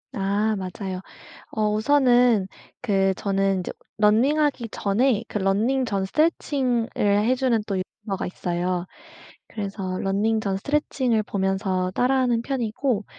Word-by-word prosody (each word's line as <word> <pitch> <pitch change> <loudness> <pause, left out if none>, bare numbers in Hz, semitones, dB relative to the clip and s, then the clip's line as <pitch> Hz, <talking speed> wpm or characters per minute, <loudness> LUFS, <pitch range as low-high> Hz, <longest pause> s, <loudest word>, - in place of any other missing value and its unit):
아 205 +2 0
맞아요. 185 0 -5 0.5
어 215 -1 0
우선은 245 -3 +4 0.3
그 195 -4 +2
저는 195 -1 0
인제 180 - -4 0.3
running하기 250 +4 +2
전에 225 +3 +1
그 210 - -3
running 225 +8 +1
전 195 -1 0
스트레칭을 265 -4 +1
해주는 225 +3 +2
또 195 -3 -2
유튜버가 195 +1 -5
있어요. 180 0 -2 0.6
그래서 200 -2 -5 0.2
running 210 +3 +1
전 195 -2 -1
스트레칭을 255 -3 0
보면서 190 -2 -1
따라 260 +2 +3
하는 240 -2 +1
편이고 240 -3 -1
215 Hz, 340 characters per minute, -24 LUFS, 195-250 Hz, 0.6 s, 우선은